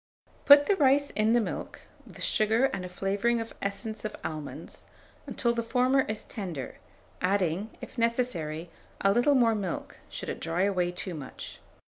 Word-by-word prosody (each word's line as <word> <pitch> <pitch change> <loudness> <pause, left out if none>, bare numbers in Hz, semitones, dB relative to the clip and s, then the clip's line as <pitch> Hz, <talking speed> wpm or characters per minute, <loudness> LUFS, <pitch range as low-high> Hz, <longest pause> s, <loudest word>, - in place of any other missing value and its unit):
Boil 285 0 +10
the 400 - +3
rice 285 -1 +4
in 215 +1 +2
the 240 - +5
milk, 225 - -4 0.3
with - - -7
sugar 220 +4 +3
and 190 - -3
a 180 - -6
flavouring 200 +6 0
of 225 0 -6
essence 215 +2 -4
of 215 - -4
almonds, 155 -2 -7 0.4
until 235 -2 0
the 235 - -1
former 250 +3 +2
is 215 -1 -2
tender, 175 - -6 0.4
adding, 185 +1 +1
if - - -8
necessary, 175 -9 -1 0.3
a 195 - +4
little 245 +7 +4
more 235 -3 +4
milk, 195 -5 -4
should - - -6
it - - -4
dry 170 +3 0
away 180 -3 +1
too 180 +1 -6
much. 145 -5 -8
215 Hz, 165 wpm, -28 LUFS, 180-235 Hz, 0.4 s, Boil